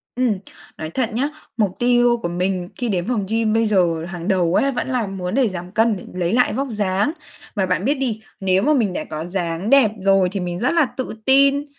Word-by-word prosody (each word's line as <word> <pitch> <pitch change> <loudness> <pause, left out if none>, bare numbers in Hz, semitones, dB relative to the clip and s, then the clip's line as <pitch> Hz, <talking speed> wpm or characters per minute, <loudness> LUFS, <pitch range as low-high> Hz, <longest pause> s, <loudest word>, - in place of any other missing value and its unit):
Ừm. 240 -6 +1 0.4
Nói 155 - -5
thật 230 +7 -1
nhá, 270 +6 0 0.3
mục 205 -5 +1
tiêu 240 0 +4
của 170 - -1
mình 180 +1 -2
khi 245 -2 -2
đến 180 -3 -1
phòng 230 -5 0
gym 225 -1 +1
bây 225 0 +3
giờ 175 -6 +1
hàng 175 -1 -6
đầu 185 -3 +2
ấy 275 - +3
vẫn 255 - -3
là 250 -5 -1
muốn 190 0 -4
để 255 -5 +3
giảm 180 -1 -7
cân, 225 +1 +2
để - - -10
lấy 180 +1 -1
lại 250 +1 +3
vóc 275 +4 -1
dáng. 205 +4 0 0.4
Mà 195 - +1
bạn 185 +1 -1
biết 280 - +3
đi, 250 -6 -3 0.2
nếu 190 0 +2
mà 305 - +3
mình 215 -9 +1
đã - - -3
có 155 +1 -4
dáng 175 +1 -3
đẹp 270 -6 +5
rồi 195 -1 +3
thì 200 - -3
mình 175 -1 -3
rất 245 - +1
là 330 -3 +4
tự 260 - -3
tin, 275 +1 +4
205 Hz, 235 wpm, -21 LUFS, 180-245 Hz, 0.4 s, đẹp